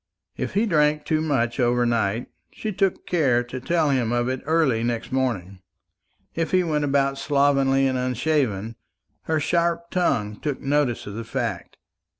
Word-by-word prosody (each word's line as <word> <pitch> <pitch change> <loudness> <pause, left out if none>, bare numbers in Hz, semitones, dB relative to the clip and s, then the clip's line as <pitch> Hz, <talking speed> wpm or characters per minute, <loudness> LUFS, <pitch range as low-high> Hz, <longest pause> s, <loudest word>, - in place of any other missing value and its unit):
If - - -4
he 210 +3 +3
drank 150 -5 +2
too 155 -1 +1
much 135 -6 0
overnight, 120 -2 +1 0.3
she 215 - -4
took 195 0 0
care 135 -9 +2
to 125 +1 -7
tell 160 0 +1
him 125 -4 +1
of 120 +1 0
it 130 0 -3
early 155 -8 +2
next 120 0 -2
morning. 105 -8 -2 0.7
If 165 -1 -1
he 185 -1 +3
went 150 -3 0
about 140 -1 +1
slovenly 140 -1 +2
and 130 -1 0
unshaven, 125 -4 -1 0.5
her 160 -1 +1
sharp 170 +2 0
tongue 105 - 0
took 145 -3 -3
notice 140 -3 0
of 105 - -7
the 115 +2 -5
fact. 115 -5 -4
135 Hz, 155 wpm, -24 LUFS, 120-155 Hz, 0.7 s, he